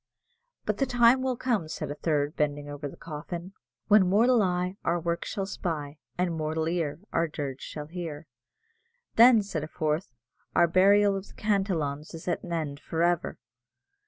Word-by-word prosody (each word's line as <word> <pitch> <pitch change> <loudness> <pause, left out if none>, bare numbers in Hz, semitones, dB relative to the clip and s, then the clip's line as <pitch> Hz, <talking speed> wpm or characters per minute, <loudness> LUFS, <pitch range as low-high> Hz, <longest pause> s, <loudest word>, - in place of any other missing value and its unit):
"But - - 0
the 270 - +2
time 245 +1 +5
will 260 -2 -1
come," 230 -10 0
said 155 -2 -5
a - - -1
third, 150 0 -1
bending 145 -1 -1
over 145 0 -5
the - - -11
coffin, 170 +4 -7 0.3
"When 205 -3 +6
mortal 230 +4 +4
eye 180 0 0
our 170 +1 +1
work 170 0 -2
shall 195 - -3
spy, 155 -6 -4 0.2
And 180 -1 0
mortal 160 0 -1
ear 165 -2 -2
our 165 0 +2
dirge 140 -4 -5
shall 150 -1 -6
hear." 165 -2 -6 0.9
"Then," 230 -2 +7
said 170 -6 -4
a - - -4
fourth, 155 0 -2 0.4
"our 170 - +6
burial 200 +3 +5
of 195 0 -5
the - - -16
Cantillons 170 -9 -1
is 165 - -10
at 175 - 0
an 175 - -8
end 155 -4 -2
for 165 +2 -2
ever!" 175 -1 +1
170 Hz, 175 wpm, -28 LUFS, 155-195 Hz, 0.9 s, Then